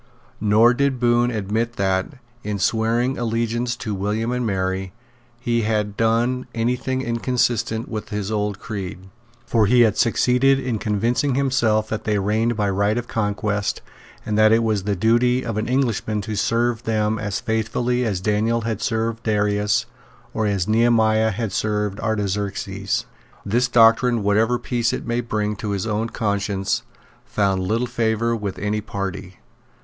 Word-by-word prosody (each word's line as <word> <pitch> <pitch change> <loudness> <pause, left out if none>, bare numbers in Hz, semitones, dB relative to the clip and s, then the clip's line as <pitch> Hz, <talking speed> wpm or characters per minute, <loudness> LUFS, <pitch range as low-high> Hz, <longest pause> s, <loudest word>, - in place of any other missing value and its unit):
Nor 110 +3 +5
did 140 0 0
Bohun 120 0 +3
admit 110 +1 -2
that, 95 +3 -1 0.3
in 105 -1 -2
swearing 115 +6 +1
allegiance 115 +1 -1
to 110 -3 -4
William 105 +4 -1
and 125 0 -1
Mary, 95 -2 -2 0.5
he 120 -1 0
had 105 -2 -1
done 120 +3 +1
any 120 +2 +1
thing 130 +1 -3
inconsistent 115 -1 0
with 110 -2 -5
his 105 -1 -3
old 105 -2 -1
creed. 95 -3 -7 0.4
For 110 -3 +2
he 125 +3 +5
had 110 -4 +3
succeeded 125 +3 +3
in 125 -5 -2
convincing 115 +6 0
himself 120 -6 +1
that 110 - -4
they 105 -1 +1
reigned 110 +3 0
by 105 -2 +1
right 100 +3 +1
of 120 0 -3
conquest, 105 -1 -1 0.4
and 105 - -1
that 110 0 +6
it 115 +1 +4
was 105 -4 0
the 105 -1 0
duty 120 +5 +2
of 115 -3 -3
an 110 +1 -2
Englishman 120 -4 0
to 110 +1 -5
serve 115 +2 0
them 110 -1 0
as 100 -2 -2
faithfully 115 +3 -1
as 100 -6 -1
Daniel 110 +3 +1
had 115 -1 -3
served 115 0 -1
Darius 105 -1 +1 0.5
or 110 -1 0
as 100 -3 0
Nehemiah 110 -1 +3
had 110 0 -3
served 105 0 -1
Artaxerxes. 100 -2 -2 0.4
This 120 +5 +1
doctrine, 115 -1 +4
whatever 110 +4 +2
peace 120 -1 -1
it - - -4
might 120 0 -2
bring 105 -1 -1
to 105 - -4
his 100 -1 -2
own 110 +1 -1
conscience, 100 -3 -1 0.4
found 100 -2 0
little 110 +6 0
favour 115 -1 0
with 100 -4 -4
any 105 +1 -1
party. 100 -2 -5
110 Hz, 155 wpm, -22 LUFS, 105-120 Hz, 0.5 s, that